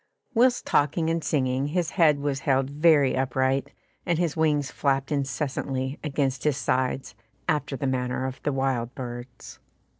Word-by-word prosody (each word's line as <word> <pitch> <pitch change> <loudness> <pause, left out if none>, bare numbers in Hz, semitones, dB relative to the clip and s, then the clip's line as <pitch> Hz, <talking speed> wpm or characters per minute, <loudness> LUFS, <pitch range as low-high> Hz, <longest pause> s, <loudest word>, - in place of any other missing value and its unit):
Whilst 245 +1 +3
talking 160 +3 +2
and 165 -1 -1
singing, 130 -1 0
his 170 +2 -1
head 155 -6 +4
was 140 -1 -1
held 135 0 +1
very 150 -2 +4
upright, 130 +2 0 0.3
and 170 -3 0
his 170 -3 0
wings 150 -3 +1
flapped 135 0 0
incessantly 135 -1 -2
against 140 -3 -1
his 150 -3 +1
sides, 130 -2 -1 0.3
after 145 -4 0
the 135 - -3
manner 130 -1 -1
of 130 0 -5
the 145 - 0
wild 135 -3 -1
birds. 120 -1 -8
135 Hz, 150 wpm, -26 LUFS, 130-150 Hz, 0.3 s, head